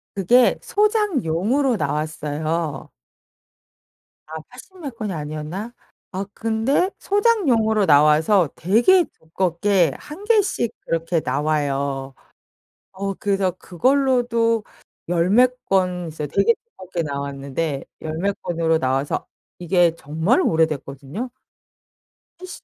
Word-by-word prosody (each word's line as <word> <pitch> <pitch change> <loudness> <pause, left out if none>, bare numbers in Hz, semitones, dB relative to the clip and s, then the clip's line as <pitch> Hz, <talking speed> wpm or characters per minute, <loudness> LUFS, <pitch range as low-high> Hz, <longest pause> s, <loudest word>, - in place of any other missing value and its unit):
그게 235 +6 +4
소장용으로 280 - +1
나왔어요. 155 0 -2 1.4
아 160 0 -6
80 310 +9 -14
몇 275 -7 -7
권이 210 -3 -3
아니었나? 155 +9 -5 0.4
아 195 +1 -3
근데 225 +10 +1
소장용으로 270 - +2
나와서 155 +4 +4
되게 240 - +4
두껍게 175 0 0
1 315 +7 -10
개씩 410 - +2
그렇게 165 +1 -1
나와요. 140 -1 -1 0.8
어 195 +1 -3
그래서 195 -2 0
그걸로도 235 - +1 0.5
10 175 0 +1
몇 250 +4 +3
권 180 -2 0
이제 155 -1 -5
되게 200 +9 +3
두껍게 185 - -6
나왔는데 140 0 -3 0.2
10 160 0 -4
몇 200 +3 -2
권으로 165 -2 0
나와서 135 +1 -1 0.3
이게 175 -1 +2
정말 160 - +1
오래됐거든요. 160 - -1 1.1
70 370 0 -10
180 Hz, 215 characters per minute, -22 LUFS, 155-240 Hz, 1.4 s, 그게